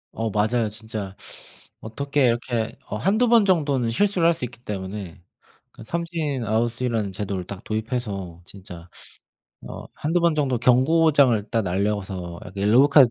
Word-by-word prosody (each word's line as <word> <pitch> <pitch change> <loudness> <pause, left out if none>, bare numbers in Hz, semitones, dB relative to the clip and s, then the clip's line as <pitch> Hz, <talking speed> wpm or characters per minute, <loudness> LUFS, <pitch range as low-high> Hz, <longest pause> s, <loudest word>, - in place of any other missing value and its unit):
어 115 0 -1
맞아요. 110 +2 +1
진짜 105 -2 -6 0.7
어떻게 140 +4 0
이렇게 120 -1 -1
어 - - -3
1-2 215 - +2
번 230 -3 +6
정도는 145 - +2
실수를 180 - +2
할 170 - +5
수 160 - -4
있기 120 -1 -8
때문에 95 -2 -6 0.5
그 - - -13
삼진 165 -4 -2
아웃이라는 115 -1 -1
제도를 95 -2 -3
딱 100 +2 -8
도입해서 105 -6 -4
진짜 90 -2 -11 0.8
어 - - -8
1-2 165 +4 0
번 170 -2 +2
정도 135 -5 +1
경고장을 130 -1 +4
딱 115 -1 +1
날려서 95 -2 -2
어 - - -12
옐로우 105 +7 +5
카드 140 -5 +6
115 Hz, 290 characters per minute, -23 LUFS, 100-140 Hz, 0.8 s, 번